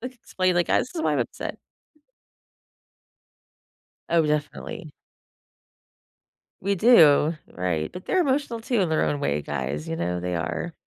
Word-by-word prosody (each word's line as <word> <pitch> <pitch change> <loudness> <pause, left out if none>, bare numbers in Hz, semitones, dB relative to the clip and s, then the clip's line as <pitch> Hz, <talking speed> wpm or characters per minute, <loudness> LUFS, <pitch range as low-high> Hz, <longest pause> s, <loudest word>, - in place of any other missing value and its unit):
like, 250 +2 -7
explain, 185 -6 -1
like, 175 -1 +1
"Ah, - - +4
this 255 - -4
is 325 - -3
why - - +1
I'm - - +1
upset." - - -4 2.5
Oh, 165 -1 +3
definitely. 150 +5 -3 1.7
We 200 +1 0
do, 165 - +5
right, 85 -3 -2
but 180 - -9
they're 375 - +1
emotional, 275 -6 0
too, 230 -1 0
in 180 - +1
their 160 - +2
own 145 -1 -1
way, 75 - 0
guys. 70 +1 -4
You 80 - -3
know? 90 +1 -2
They 90 0 -3
are, 85 - -3
160 Hz, 150 wpm, -25 LUFS, -, 2.5 s, do